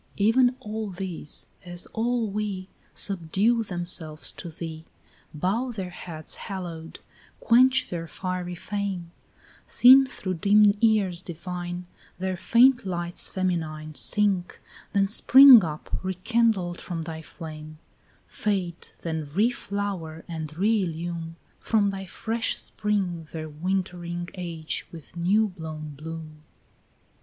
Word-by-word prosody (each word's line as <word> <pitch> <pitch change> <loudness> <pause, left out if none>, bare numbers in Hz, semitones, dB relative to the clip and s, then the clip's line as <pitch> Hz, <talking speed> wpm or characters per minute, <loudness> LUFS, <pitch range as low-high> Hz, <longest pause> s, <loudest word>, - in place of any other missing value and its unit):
16 200 - +3
Even 250 +2 +4
all 215 -3 -4
these 180 -4 -3 0.2
as 175 -1 -6
all 235 0 0
we 200 -2 -3 0.3
Subdue 200 +5 +1
themselves 175 -5 -3
to 175 - -8
thee, 160 -1 -7 0.5
Bow 200 - -1
their 190 -5 -5
heads 160 -3 -4
haloed, 170 -4 -6 0.4
quench 260 +3 +4
their 165 -2 -5
fiery 180 0 -4
fame; 190 -2 -4 0.6
Seen 265 +2 +8
through 185 -7 -4
dim 205 +4 +5
years 205 -6 +3
divine, 175 +1 -6 0.3
Their 185 0 -2
faint 240 +7 +5
lights 175 -2 -2
feminine 160 -5 -2
Sink, 195 +1 +2 0.3
then 200 -1 +3
spring 255 +2 +9
up 155 -2 -4
rekindled 190 -1 0
from 170 -3 -4
thy 160 -1 -6
flame; 155 -1 -9 0.5
Fade, 185 -5 -2 0.2
then 160 -2 -2
reflower 195 -2 -2
and 160 -2 -5
reillume 170 -5 -1 0.2
From 210 -3 +2
thy 195 -1 -5
fresh 225 +5 -2
spring 190 -6 -2
their 160 -1 -5
wintering 175 +1 -3
age 170 -4 -4
with 165 0 -12
new 200 +6 +2
blown 160 -4 -7
bloom. 155 +1 -8
180 Hz, 115 wpm, -26 LUFS, 165-210 Hz, 0.6 s, spring